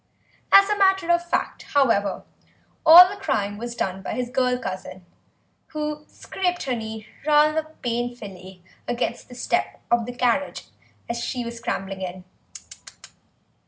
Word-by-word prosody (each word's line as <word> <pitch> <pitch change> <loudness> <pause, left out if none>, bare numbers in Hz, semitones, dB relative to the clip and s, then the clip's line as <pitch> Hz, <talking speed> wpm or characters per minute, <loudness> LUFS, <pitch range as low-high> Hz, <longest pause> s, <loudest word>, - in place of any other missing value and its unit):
As 395 0 +8
a 420 - +1
matter 385 -3 +3
of 345 0 +1
fact, - - -1
however, 225 -8 +2 0.6
all 345 +3 +10
the 400 +1 -8
crying 205 - -1
was 235 +1 -6
done 190 -3 -3
by - - -5
his 250 -1 -3
girl 250 -1 +1
cousin, 185 -5 -7 0.6
who 300 -1 -5
scraped 360 -2 -3
her 260 - -2
knee 220 -1 -6 0.2
rather 305 +1 +4 0.2
painfully 210 -7 -5 0.2
against 240 +1 -3
the 245 - -11
step - - -1
of 235 -1 +2
the 245 - -5
carriage 250 +3 -1 0.4
as 235 0 -3
she 245 -2 -3
was 235 0 -6
scrambling 195 -4 -4
in. 185 0 -6
245 Hz, 140 wpm, -23 LUFS, 215-305 Hz, 0.6 s, all